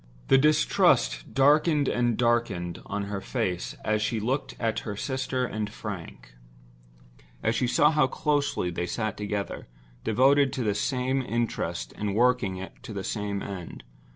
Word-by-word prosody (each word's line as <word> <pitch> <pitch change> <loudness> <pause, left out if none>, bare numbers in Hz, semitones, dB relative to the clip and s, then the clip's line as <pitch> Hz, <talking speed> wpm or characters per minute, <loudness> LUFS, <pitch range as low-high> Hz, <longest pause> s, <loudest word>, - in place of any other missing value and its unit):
The 135 - +7
distrust 150 - +3
darkened 145 +2 +4
and 120 -2 +1
darkened 120 -8 0
on 105 - -2
her 100 -1 -4
face 90 -2 -2
as 110 -1 +1
she 110 +2 0
looked 130 +6 -2
at 115 -2 0
her 105 -2 -6
sister 130 0 -1
and 105 -3 -3
Frank; 85 - -8 1.1
as 115 - +2
she 125 +2 +1
saw 150 +5 +4
how 150 -3 +3
close 145 +1 0
they 90 0 -2
sat 110 +2 -2
together, 100 -2 -4 0.4
devoted 135 +5 +4
to 130 - -2
the 105 -2 +1
same 130 +5 0
interest 120 - -2
and 105 -1 -2
working 105 -6 +1
to 130 -4 -8
the 100 -1 -4
same 100 0 -3
end. 95 -9 -7
115 Hz, 150 wpm, -27 LUFS, 100-130 Hz, 1.1 s, The